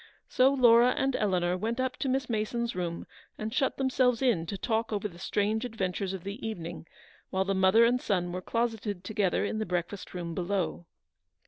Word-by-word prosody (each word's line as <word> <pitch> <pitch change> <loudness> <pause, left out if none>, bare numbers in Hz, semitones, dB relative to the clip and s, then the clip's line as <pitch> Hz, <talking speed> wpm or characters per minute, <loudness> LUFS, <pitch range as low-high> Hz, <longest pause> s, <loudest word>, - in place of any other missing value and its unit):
So 260 +2 +4
Laura 245 -2 +5
and 270 -1 +1
Eleanor 180 -3 +1
went 225 +6 -2
up 260 0 0
to 270 - -1
Miss 260 0 0
Mason's 235 +1 -2
room 170 -2 -3 0.3
and 220 +1 -4
shut 270 - +1
themselves 255 -2 +2
in 195 -11 +2
to 200 - -4
talk 225 +1 -1
over 210 0 -1
the 175 -3 -14
strange 210 +4 0
adventures 195 -5 -2
of 190 -3 -6
the 200 +6 -6
evening, 175 -6 -5 0.4
while 190 0 0
the 195 - 0
mother 190 +4 +5
and 245 +2 +2
son 175 -3 0
were 180 +1 -4
closeted 220 -3 -2
together 200 -2 0
in 215 - -2
the - - 0
breakfast 180 +2 -3
room 170 -2 -4
below. 180 -1 -2
210 Hz, 190 wpm, -29 LUFS, 185-235 Hz, 0.4 s, Laura